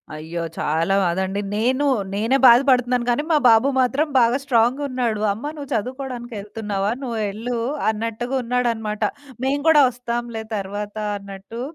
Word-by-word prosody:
అయ్యో! 160 +2 -5 0.2
చాలా 165 +5 +1
బాదండి. 190 +3 -1
నేను 255 +6 +1 0.3
నేనే 225 +6 +2
బాధపడతన్నాను 250 -1 +4
కానీ, 245 +5 +1
మా 305 - +5
బాబు 225 +4 +5
మాత్రం 275 +5 +1
బాగా 240 +2 +3
స్ట్రాంగ్‌ 245 0 +2
ఉన్నాడు, 240 -5 -1
"అమ్మ 270 +9 -5
నువ్వు 285 -2 -7
చదువుకోడానికెళ్తున్నావా? 225 -4 -3
నువ్వెళ్ళు" 225 0 -3 0.3
అన్నట్టుగా 230 +4 -3
ఉన్నాడనమాట. 230 -3 -1 0.4
"మేము 280 +2 0
గూడా 300 -3 +7
ఒస్తాంలే 235 -2 -4
తర్వాత" 205 +2 -5 0.2
అన్నట్టు 200 +4 -9
230 Hz, 125 wpm, -22 LUFS, 210-250 Hz, 0.4 s, గూడా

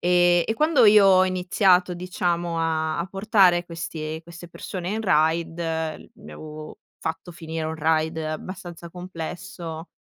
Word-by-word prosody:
E 175 -1 +4
e - - -1
quando 300 -1 +4
io 210 -2 +7
ho 185 -1 +6
iniziato 185 0 +2
diciamo 175 -1 -2
a 160 -1 -1
a 170 - -2
portare 195 -3 +3
questi 160 -2 -5
queste 170 +1 -12
persone 180 +1 -6
in 220 +2 -2
Raid, 165 -2 +1 0.6
mi 215 -3 -13
avevo 155 0 -9 0.2
fatto 165 +2 -5
finire 160 -1 -5
un 160 0 -4
Raid 160 +1 +1
abbastanza 170 +2 -6
complesso, 175 -1 -7
175 Hz, 135 wpm, -24 LUFS, 160-185 Hz, 0.6 s, io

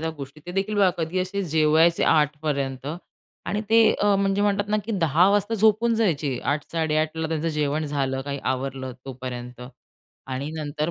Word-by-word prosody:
त्या 160 0 -2
गोष्टी 140 +2 -9
ते 175 - -6
देखील 195 +3 -1
बघा 195 -3 +5
कधी 165 +3 -2
असे 195 +2 -2
जेवायचे 160 +1 +3
8 150 -2 +3
पर्यंत 135 -3 -2 0.6
आणि 210 - -1
ते 230 0 +6
अ, 205 -1 +2
म्हणजे 195 +1 +1
म्हणतात 205 0 +1
ना, 215 - +2
की 225 - -4
10 165 +4 +4
वाजता 205 +2 +1
झोपून 220 +2 +3
जायचे. 155 - 0
8, 145 +1 0
8:30 160 0 0
त्यांचं 165 0 -1
जेवण 150 0 -1
झालं 135 -2 -1
काही 140 0 -4
आवरलं 130 0 -4
तोपर्यंत 125 -2 -7 0.7
आणि 135 +3 -4
नंतर 150 +1 -2
155 Hz, 170 wpm, -24 LUFS, 140-195 Hz, 0.7 s, ते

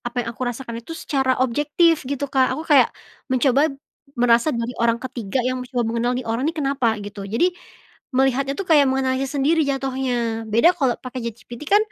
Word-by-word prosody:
apa 240 0 -3
yang - - -5
aku 240 - -8
rasakan 235 -1 -6
itu 325 +8 -9
secara 265 -4 0
objektif 295 +6 +2
gitu, 280 0 -2
Kak, 260 -1 +2
aku 310 - -4
kayak 275 - +6 0.4
mencoba, 265 +3 +3 0.5
merasa 240 +4 +4
jadi 235 -1 -3
orang 235 0 +2
ketiga 245 -3 -4
yang 255 0 -1
mencoba 250 -1 -2
mengenal 235 +2 0
nih 255 - -6
orang 230 +2 -1
ini 330 - -3
kenapa? 270 -6 0
Gitu 205 0 -8
jadi, 290 - +3 0.7
melihatnya 270 +1 +2
tuh 390 - -3
kayak 295 -4 +6
menganalisis 265 +1 -1
sendiri 315 +4 +3
jatuhnya 255 -4 -1
beda 235 +12 +5
kalau 265 -7 +1
pakai 255 0 -7
ChatGPT 235 +3 -12
kan 410 - +6
255 Hz, 180 wpm, -22 LUFS, 235-275 Hz, 0.7 s, kayak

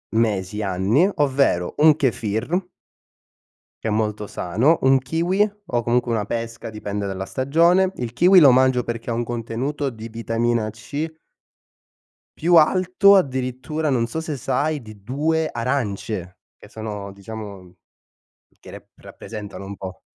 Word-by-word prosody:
mesi, 105 -2 0
anni, 100 - +2
ovvero 135 -11 +1
un 150 0 +6
Kefir 120 - -1 1.2
che - - -3
è - - 0
molto 105 -1 -1
sano, 115 - +1
un 135 0 +5
kiwi 170 +10 +1 0.2
o 120 -1 -1
comunque 120 0 +1
una 110 -2 0
pesca 115 +1 -5
dipende 105 -2 -4
dalla 95 0 -4
stagione. 170 - +2
Il 120 -2 -4
kiwi 180 +8 +6
lo 140 -4 +8
mangio 130 -1 +3
perché 115 0 -5
ha - - 0
un 120 +1 -1
contenuto 120 +5 -3
di 115 -1 -9
vitamina 115 0 -1
C 145 +9 -5 1.3
più 170 +1 +3
alto 185 +5 +5
addirittura 135 0 -1
non 120 -3 +1
so 160 +7 -4
se 155 -3 -4
sai 145 +4 -1
di 110 -3 -13
2 155 +6 0
arance, 110 -7 -3 0.2
che - - -16
sono, 105 -3 -6
diciamo, 100 -2 -9 0.8
che - - -13
rep - - -12
rappresentano 105 -3 -9
un 100 0 -7
po'. 95 -1 -8
120 Hz, 140 wpm, -22 LUFS, 105-150 Hz, 1.3 s, lo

